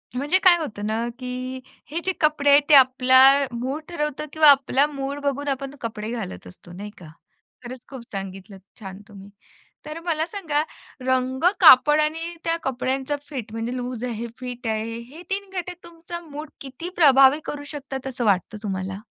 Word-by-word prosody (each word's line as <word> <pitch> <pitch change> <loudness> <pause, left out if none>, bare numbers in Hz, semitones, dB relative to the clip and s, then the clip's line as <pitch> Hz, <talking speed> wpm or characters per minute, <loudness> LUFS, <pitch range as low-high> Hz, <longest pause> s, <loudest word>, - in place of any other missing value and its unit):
म्हणजे 290 +8 +1
काय 360 -2 +7
होतं 215 -10 -5
ना, 225 +2 -1
की 255 0 -5 0.3
हे 330 - -2
जे 380 - +1
कपडे 300 -2 +2
आहेत 285 +1 +7
ते 300 - +8
आपला 260 -1 +6 0.3
मूड 260 +6 -4
ठरवतं 300 -3 -3
किंवा 315 -1 +6
आपला 275 0 +3
मूड 280 -1 -5
बघून 285 0 -2
आपण 275 0 -3
कपडे 220 -2 -5
घालत 95 - -6
असतो 130 - -15
नाही 200 +4 -8
का? 170 -3 -12 0.5
खरंच 250 0 -9
खूप 265 -3 -8
सांगितलंत 195 0 -8 0.2
छान 190 -2 -9
तुम्ही. 200 -2 -13 0.6
तर 305 +2 -7
मला 320 -2 0
सांगा, 325 -6 -2 0.4
रंग, 260 +1 0 0.2
कापड 300 -2 +7
आणि 325 +3 -1
त्या 330 0 0
कपड्यांचा 265 +2 -2
फिट, 250 -7 -6
म्हणजे 225 +2 -4
लूज 245 -1 -5
आहे 235 -1 -4
फिट 245 -2 -6
आहे. 220 +1 -2
हे 260 +8 -12
3 395 0 -1
घटक 360 0 -6
तुमचा 340 0 -9
मूड 300 +1 -8
किती 275 +6 -7
प्रभावी 275 -2 +6
करू 290 0 -5
शकतात 270 -2 -6
असं 250 -2 -3
वाटतं 200 +1 +1
तुम्हाला? 190 -1 -4
260 Hz, 170 wpm, -23 LUFS, 230-300 Hz, 0.6 s, ते